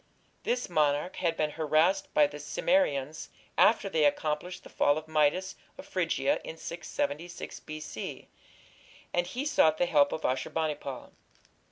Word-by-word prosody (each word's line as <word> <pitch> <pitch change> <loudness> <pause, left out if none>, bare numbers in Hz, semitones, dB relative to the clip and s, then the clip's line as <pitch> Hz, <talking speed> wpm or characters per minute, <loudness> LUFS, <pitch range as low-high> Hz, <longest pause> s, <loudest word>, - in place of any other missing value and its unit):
This 245 +1 0
monarch 150 -1 +1
had 170 -2 0
been 150 -1 0
harassed 160 +6 +2
by 150 - +7
the 145 +1 -6
Cimmerians 150 - 0 0.3
after 220 -2 +4
they 160 -5 +1
accomplished 150 +4 0
the - - -12
fall 145 +1 +2
of 155 0 -6
Midas 160 +5 +1 0.2
of - - -9
Phrygia - - 0
in - - -7
676 285 -12 -4
B.C., 155 0 -7 0.9
and 175 0 +1
he 255 +9 -4
sought 160 - +4
the 175 - +2
help 145 -4 +4
of 160 - -3
Ashur 130 0 0
bani 160 -2 0
pal. 140 -3 -8
155 Hz, 150 wpm, -29 LUFS, 150-185 Hz, 0.9 s, by